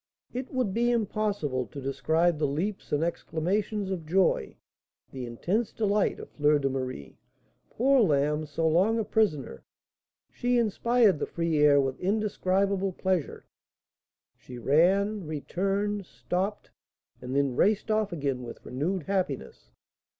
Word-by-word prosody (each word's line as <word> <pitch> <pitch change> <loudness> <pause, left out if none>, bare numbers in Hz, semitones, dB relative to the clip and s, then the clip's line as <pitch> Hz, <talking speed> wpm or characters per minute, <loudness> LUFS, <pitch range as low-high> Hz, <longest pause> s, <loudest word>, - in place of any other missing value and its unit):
It 255 +1 -4
would 250 -7 -1
be 240 +2 +2
impossible 205 - -1
to 140 - -9
describe 155 +5 +1
the 150 - +2
leaps 180 +9 -3
and 150 +2 +1
exclamations 190 +5 -2
of 170 -5 -4
joy, 185 +2 +1 0.5
the 130 -2 -6
intense 185 - -1
delight, 210 -2 +1
of - - -10
Fleur 150 0 +3
de 135 -1 -1
Marie. 130 - -5 0.5
Poor 265 +2 +3
lamb! 150 -3 +1
so 160 +3 -1
long 190 +8 +3
a 225 - +1
prisoner, 195 - 0 0.7
she 245 0 0
inspired 230 -3 +3
the - - -2
free 165 -1 -1
air 145 -1 +6
with 135 -1 -1
indescribable 195 -1 0
pleasure. 185 -4 -2 0.9
She 125 - -11
ran, 185 - +2
returned, 195 +6 -2
stopped, 180 - -3 0.5
and 125 +1 -5
then 140 -3 +1
raced 210 - +2
off 215 -2 +1
again 140 -6 -2
with 120 -1 -9
renewed 160 +8 -2
happiness. 185 -6 -3
180 Hz, 135 wpm, -28 LUFS, 145-210 Hz, 0.9 s, air